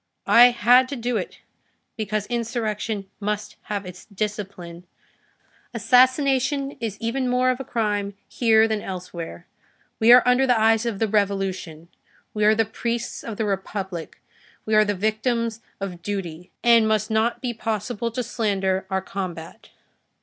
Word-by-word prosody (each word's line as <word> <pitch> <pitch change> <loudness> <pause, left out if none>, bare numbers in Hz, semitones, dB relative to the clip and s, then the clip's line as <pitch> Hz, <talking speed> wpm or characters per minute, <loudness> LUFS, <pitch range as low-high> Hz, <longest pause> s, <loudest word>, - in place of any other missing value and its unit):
I 240 +1 +8
had 245 +1 +4
to 280 - -4
do 245 0 -2
it, - - -6 0.5
because 215 -1 -2
insurrection 220 -3 -3
must 210 0 -3
have 205 -2 -4
its 180 0 -10
discipline. 195 -4 -6 0.9
Assassination 265 +4 +3
is 220 -4 -4
even 250 +3 -1
more 250 +1 +3
of 250 - -4
a - - -4
crime 205 -5 -2
here 225 -2 +3
than 220 -2 -2
elsewhere; 175 - -7 0.5
we 225 +2 +6
are 250 0 +8
under 250 +2 +4
the 245 -3 +3
eyes 225 +1 +3
of 225 -4 -2
the 225 - 0
Revolution, 195 -5 -2 0.5
we 210 - -1
are 215 +1 +5
the 225 0 +2
priests 235 +2 -4
of 225 -3 -6
the 220 - -1
Republic, 190 -3 -4 0.5
we 215 - -2
are 215 0 +6
the 205 0 -1
victims 225 +3 -1 0.2
of 185 -3 -6
duty, 180 -3 -5
and 235 -2 +5
must 215 0 0
not 220 +2 +1
be 245 -2 -3
possible 225 +1 -3
to 245 +2 -3
slander 195 -5 -1
our 190 -1 -1
combat. 180 -4 -7
215 Hz, 150 wpm, -23 LUFS, 195-235 Hz, 0.9 s, I